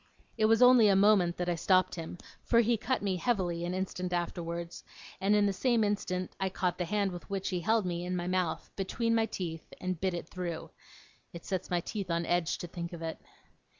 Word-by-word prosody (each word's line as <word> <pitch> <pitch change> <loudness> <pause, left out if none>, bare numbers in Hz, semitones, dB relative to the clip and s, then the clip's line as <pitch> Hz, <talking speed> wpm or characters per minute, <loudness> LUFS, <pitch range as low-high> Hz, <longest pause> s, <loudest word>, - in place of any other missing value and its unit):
It 220 - +2
was 225 +2 +5
only 250 -3 +8
a 200 - +5
moment 195 -3 +4
that 180 - -2
I 175 - +2
stopped 185 +2 +3
him, 165 0 -6 0.2
for 235 -1 +4
he 235 +1 +2
cut 235 +2 -1
me 190 -2 0
heavily 175 -5 0
an 180 +1 -2
instant 185 -1 -3
afterwards, 170 -1 -3 0.4
and 200 +2 +3
in 205 -1 +4
the 200 - +1
same 235 +1 +2
instant 185 -3 -2
I 190 0 0
caught 180 -1 -1
the 180 - 0
hand 200 +1 0
with 175 +2 -9
which 195 -1 -2
he 180 -2 -1
held 220 +4 +2
me 175 -1 -2
in 180 +1 -2
my 175 -1 -2
mouth, 180 -2 -1
between 230 +4 -1
my 225 -1 +2
teeth, 165 -6 -5
and 185 -2 -3
bit 190 -2 0
it 170 - -5
through. 175 -3 -5 0.6
It 170 - -9
sets 190 -1 -3
my 175 -1 +1
teeth 195 0 -5
on 170 0 0
edge 175 -1 +1
to 175 - -6
think 170 0 -6
of 165 -1 -7
it. 160 -1 -4
185 Hz, 220 wpm, -31 LUFS, 175-205 Hz, 0.6 s, only